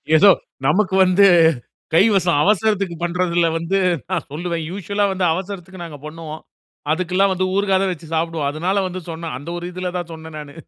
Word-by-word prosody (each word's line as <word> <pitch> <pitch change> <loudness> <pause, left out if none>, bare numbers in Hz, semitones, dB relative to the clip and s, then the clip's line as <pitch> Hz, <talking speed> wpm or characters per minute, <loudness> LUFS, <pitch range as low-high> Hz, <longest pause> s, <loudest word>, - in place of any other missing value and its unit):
ஏதோ 195 +5 +8 0.4
நமக்கு 190 +4 +2
வந்து, 185 +2 +5 0.7
கைவசம் 180 -4 +4
அவசரதுக்கு 200 -3 +1
பண்றதில 175 -1 +1
வந்து 170 +4 -1 0.3
நான் 185 -3 -2
சொல்லுவேன். 170 +1 -3
யூசுவல்லா 200 +2 -1
வந்து 185 -1 0
அவசரத்துக்கு 185 -1 -6
நாங்க 150 -3 -9
பண்ணுவோம். 155 0 -8 0.5
அதுக்கெல்லாம் 185 +3 +1
வந்து 185 0 0
ஊறுகாய் 195 -1 +2
தான் 190 - 0
வைச்சு 165 -2 -8
சாப்பிடுவோம். 160 -3 -1
அதனால 175 +6 -1
வந்து 185 0 -6
சொன்னேன். 165 -4 -5
அந்த 145 +5 -9
ஒரு 175 - -6
இதில 180 0 -4
தான் 170 -1 -5
சொன்னேன் 160 -1 -10
நானு. 145 -1 -10
175 Hz, 165 wpm, -20 LUFS, 165-190 Hz, 0.7 s, ஏதோ